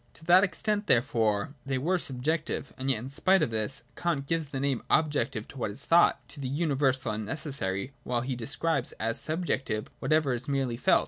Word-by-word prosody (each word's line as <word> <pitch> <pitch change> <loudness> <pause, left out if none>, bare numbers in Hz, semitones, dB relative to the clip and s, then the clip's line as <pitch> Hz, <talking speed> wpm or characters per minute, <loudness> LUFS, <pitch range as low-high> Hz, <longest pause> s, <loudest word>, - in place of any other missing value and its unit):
To 160 - -14
that 180 +3 +7
extent 210 +1 -1
therefore, 115 -1 +2
they 135 -1 -1
were 175 +8 +1
subjective. 150 0 -2
And 130 +1 -3
yet 130 - +3
in 125 +5 -7
spite 190 +7 +3
of - - -1
this, 110 +3 -2
Kant 165 -6 -1
gives 165 +1 -1
the 135 - -4
name 135 -3 0
objective 145 -8 +1
to 135 - -10
what 115 - -1
is 105 +7 -9
thought, 170 +1 +4
to 145 - -12
the 135 - -3
universal 135 -5 +1
and 110 0 -3
necessary, 110 -4 -3
while 120 -1 -1
he 130 +1 -2
describes 140 +3 -1
as 115 +1 -1
subjective 145 -9 -1
whatever 155 -4 +2
is 125 +3 -2
merely 135 -4 0
felt. 120 - +4
135 Hz, 195 wpm, -29 LUFS, 120-160 Hz, -, that